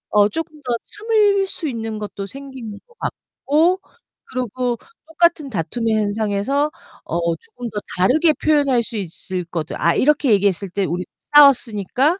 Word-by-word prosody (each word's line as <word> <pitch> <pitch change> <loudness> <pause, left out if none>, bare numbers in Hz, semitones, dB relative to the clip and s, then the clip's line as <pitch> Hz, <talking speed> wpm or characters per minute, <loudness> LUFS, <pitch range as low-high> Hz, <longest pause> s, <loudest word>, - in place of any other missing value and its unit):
어 205 0 +6
조금 320 +3 -5
더 250 -3 -2
참을 415 -2 +2
수 335 -4 -4
있는 225 -4 -4
것도 205 -1 -6
생기는 265 -4 -8
것 470 - -25
같고 330 +6 0 0.5
그리고 250 -1 -2 0.3
똑같은 325 -2 +2
다툼의 225 +3 -1
현상에서 215 +7 0 0.3
어 170 0 -1
조금 245 +7 -9
더 210 - -3 0.2
다르게 305 - +4
표현할 285 -6 +2
수 230 0 -8
있을 185 -1 -4
거다. 165 -2 -4
아 170 +1 +3
이렇게 295 -3 +3
얘기했을 200 -1 +1
때 200 +2 -1
우리 180 +1 -2 0.3
싸웠으니까. 270 - +5
245 Hz, 300 characters per minute, -20 LUFS, 205-300 Hz, 0.5 s, 어